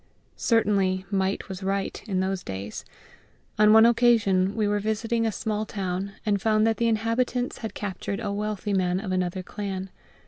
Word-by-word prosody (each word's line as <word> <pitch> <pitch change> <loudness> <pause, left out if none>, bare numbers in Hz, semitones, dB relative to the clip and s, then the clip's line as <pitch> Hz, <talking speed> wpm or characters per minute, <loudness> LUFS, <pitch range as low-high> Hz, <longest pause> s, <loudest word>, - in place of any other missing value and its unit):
Certainly, 195 -5 +1
might 195 0 0
was 190 -1 -7
right 195 0 -2
in 190 -3 0
those 190 0 -1
days. 95 +2 -6 0.8
On 210 0 +7
one 220 +1 +8
occasion 215 -5 +3
we 215 -2 +1
were 205 0 +1
visiting 225 +2 0
a - - 0
small 215 +1 -2
town, 195 -2 -3
and 205 -2 +1
found 215 0 +3
that 225 0 +2
the 235 - +1
inhabitants 230 +3 0
had 220 - -6
captured 200 0 -4
a 210 -3 -3
wealthy 210 0 -2
man 185 -1 +1
of 195 -2 -4
another 185 0 -1
clan. 195 -1 -5
205 Hz, 170 wpm, -26 LUFS, 190-220 Hz, 0.8 s, one